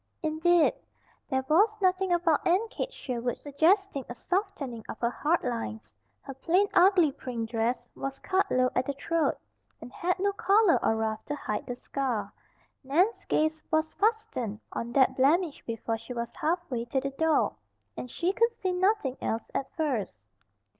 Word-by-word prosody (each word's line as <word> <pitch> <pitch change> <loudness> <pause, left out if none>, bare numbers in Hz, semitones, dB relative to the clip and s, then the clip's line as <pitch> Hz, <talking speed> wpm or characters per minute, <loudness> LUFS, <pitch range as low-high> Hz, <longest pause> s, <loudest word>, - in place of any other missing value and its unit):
Indeed, 325 +3 +3 0.6
there 265 -2 0
was 410 +8 +4
nothing 375 -1 +2
about 340 -3 +2
Aunt 390 +6 +2
Kate - - -4
Sherwood 245 - -3
suggesting 320 +2 +1
a 240 - -6
softening 335 - -3
of - - -5
her 235 0 0
hard 320 +7 0
lines. 230 -2 -4 0.3
Her 275 - -7
plain, 350 +9 +2
ugly 360 -4 +5
print 235 -4 -5
dress 235 +1 -1
was 275 0 -5
cut 390 +1 0
low 255 0 +2
at 255 - 0
the 280 - -1
throat, 325 +3 0 0.4
and 245 - -11
had 360 +2 0
no 400 +2 +1
collar 400 -1 +3
or 225 - +3
ruff 220 -1 -2
to 295 - -3
hide 210 -7 -4
the 245 - -3
scar. 250 -3 -3 0.5
Nan's 345 - +1
gaze 315 0 +1
was 315 0 +1
fastened 430 - -1
on 235 +1 -4
that 265 -1 +4
blemish 305 +4 +2
before 225 0 -3
she 230 +2 -8
was 235 -1 -4
half 330 +3 0
way 235 -2 -2
to 265 +3 0
the 275 +1 -3
door, 320 +3 +1 0.4
and 250 - -6
she 355 +8 -1
could 465 +3 +3
see 375 -5 -2
nothing 365 - +1
else 225 0 -3
at 270 - -2
first. 285 - -2
300 Hz, 170 wpm, -28 LUFS, 250-365 Hz, 0.6 s, ugly